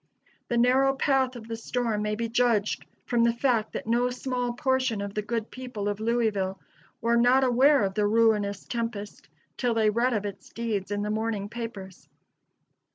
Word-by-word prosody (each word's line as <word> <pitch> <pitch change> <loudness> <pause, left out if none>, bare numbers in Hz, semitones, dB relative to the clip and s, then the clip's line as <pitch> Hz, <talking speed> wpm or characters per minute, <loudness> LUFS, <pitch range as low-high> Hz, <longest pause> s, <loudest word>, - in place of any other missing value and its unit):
The 240 - 0
narrow 260 +3 +4
path 265 -2 +1
of 225 -2 -9
the 230 - -4
storm 230 -1 -2
may 210 0 -1
be 230 +1 -2
judged 230 -3 +1 0.2
from 235 -1 +2
the 235 - +4
fact 235 -3 +1
that - - -4
no 240 +2 +2
small 250 -1 -2
portion 260 -3 0
of 200 0 -4
the 210 - -1
good 225 +1 -3
people 250 -6 -5
of 205 0 -2
Louisville 215 -4 0 0.4
were 235 +1 +2
not 250 +3 +5
aware 260 +1 +4
of 195 -1 -1
the 210 +1 +1
ruinous 210 -2 +2
tempest 230 -3 -5 0.3
till 245 -3 0
they 220 -1 +3
read 240 +3 +1
of 210 -2 -1
its 195 -1 -7
deeds 220 -5 -3
in 205 0 -2
the 210 - -2
morning 215 -2 -2
papers. 210 -5 -8
230 Hz, 180 wpm, -27 LUFS, 210-245 Hz, 0.4 s, not